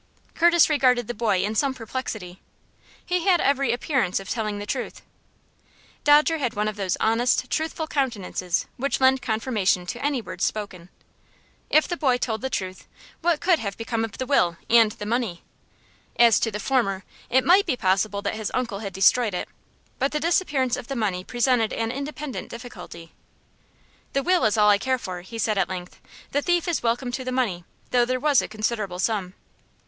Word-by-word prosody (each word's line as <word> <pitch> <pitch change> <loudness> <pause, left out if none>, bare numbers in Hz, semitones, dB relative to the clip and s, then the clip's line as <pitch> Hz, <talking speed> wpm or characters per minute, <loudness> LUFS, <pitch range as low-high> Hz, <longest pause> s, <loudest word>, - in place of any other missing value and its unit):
Curtis 345 -1 +5
regarded 255 -6 +2
the 240 - -3
boy 210 -5 +1
in 210 +2 -1
some 265 +4 +1
perplexity. 220 -6 -6 0.6
He 360 -1 -1
had 360 -3 +5
every 275 -3 +2
appearance 240 - 0
of 195 - -10
telling 215 -3 -2
the 205 - -5
truth. - - -4 1.0
Dodger 300 +2 +5
had 245 -5 -2
one 210 +1 0
of 215 - -3
those 195 -3 -1
honest, 245 +3 +1
truthful 315 0 -1
countenances 215 - -2
which 275 +3 -1
lend 260 0 +4
confirmation 220 -6 0
to 240 +9 -6
any 285 -2 +1
words 230 - -6
spoken. 190 -5 -3 0.8
If 310 - +4
the 345 - -3
boy 260 -6 +2
told 225 -3 -2
the 265 - -2
truth, 185 -5 -4 0.3
what 335 -2 +1
could 345 -2 +3
have 200 -2 -4
become 225 0 -2
of 225 -3 -5
the 260 - -3
will 175 -11 +2
and 230 -2 +6
the 210 - -7
money? 220 -6 -2 0.7
As 235 -2 +6
to 225 - 0
the 210 -1 -5
former, 200 -5 0 0.3
it 260 +1 +3
might 380 +3 +5
be 265 -6 0
possible 200 0 0
that 200 - -1
his 220 -1 -3
uncle 240 -6 -2
had 200 -3 -6
destroyed 205 +2 +3
it, - - -3 0.5
but 275 - +1
the 300 - 0
disappearance 295 -6 +1
of 235 - -8
the 275 - -4
money 195 -6 -1
presented 240 0 +1
an 225 0 -2
independent 280 -5 -5
difficulty. 180 -8 -10 1.0
"The 275 - +1
will 360 -6 +3
is 220 +1 +2
all 210 -1 +6
I 200 - +3
care 260 +5 0
for," 185 -7 -6
he 210 +6 -9
said, 215 -2 0
at 185 - +1
length. 180 -1 -7 0.3
"The 285 - +1
thief 350 +2 +1
is 345 - 0
welcome 245 +2 -1
to 260 +2 -4
the 255 - -3
money, 210 -10 -1 0.3
though 245 -1 +4
there 255 +1 -1
was 290 -1 +4
a - - -5
considerable 215 -3 -3
sum." 190 -2 -1
235 Hz, 190 wpm, -24 LUFS, 205-270 Hz, 1.0 s, and